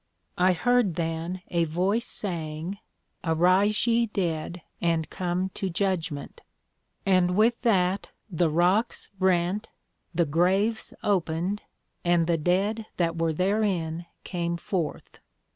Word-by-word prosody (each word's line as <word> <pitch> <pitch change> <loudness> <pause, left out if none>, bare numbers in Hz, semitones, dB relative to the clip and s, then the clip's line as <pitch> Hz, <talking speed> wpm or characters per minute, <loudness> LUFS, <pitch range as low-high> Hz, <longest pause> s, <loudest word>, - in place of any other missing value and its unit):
I 185 +1 +5
heard 235 0 +2
then 165 +2 -3
a 170 -1 +2
Voice 190 +9 0
saying, 170 0 -4 0.4
Arise 185 +6 +3
ye 235 0 +3
dead, 175 -4 -2 0.2
and 165 -2 +1
come 180 +1 -1
to 190 0 -3
Judgment; 170 -5 -2 0.6
and 180 -2 +3
with 230 +3 +3
that 195 -5 +2 0.2
the 175 -4 +1
Rocks 180 +9 +1
rent, 185 +2 +1 0.4
the 170 -1 +2
Graves 190 +8 +1
opened, 185 0 0 0.4
and 175 -1 +3
the 165 -1 +1
Dead 200 +7 +1
that 165 -2 +1
were 165 0 +1
therein 180 -2 0 0.2
came 170 -2 -2
forth. 170 -2 -4
180 Hz, 115 wpm, -27 LUFS, 165-200 Hz, 0.6 s, I